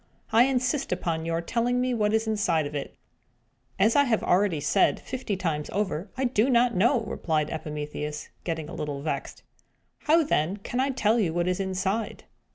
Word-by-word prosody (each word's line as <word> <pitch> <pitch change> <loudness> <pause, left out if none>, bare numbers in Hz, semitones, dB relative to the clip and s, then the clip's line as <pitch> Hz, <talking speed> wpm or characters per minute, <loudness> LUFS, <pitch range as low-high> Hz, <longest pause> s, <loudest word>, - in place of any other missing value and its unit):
I 230 +3 +6
insist 265 +1 0
upon 165 -1 -2
your 165 0 0
telling 240 +7 0
me 250 0 +1
what 210 -3 +1
is 220 +1 +1
inside 205 -8 +1
of 145 - -6
it." 145 -2 -5 0.8
"As 220 +3 +3
I 285 0 +5
have 230 -4 +1
already 180 -3 +2
said, 155 +7 +2
fifty 245 -6 -4
times 160 -5 -2
over, 190 -2 -2
I 265 - -1
do 245 -1 +2
not 240 -1 +4
know!" 235 +6 +3
replied 160 -8 -1
Epimetheus, 150 -1 -5
getting 160 -3 -3
a 175 - -9
little 145 -4 -4
vexed. 140 -3 -4 0.6
"How, 325 +2 +4
then, 190 - 0
can 240 +5 -4
I 270 +2 +2
tell 235 -3 +2
you 170 -6 0
what 175 0 +1
is 180 +1 0
inside?" 190 +3 -2
200 Hz, 180 wpm, -26 LUFS, 160-240 Hz, 0.8 s, I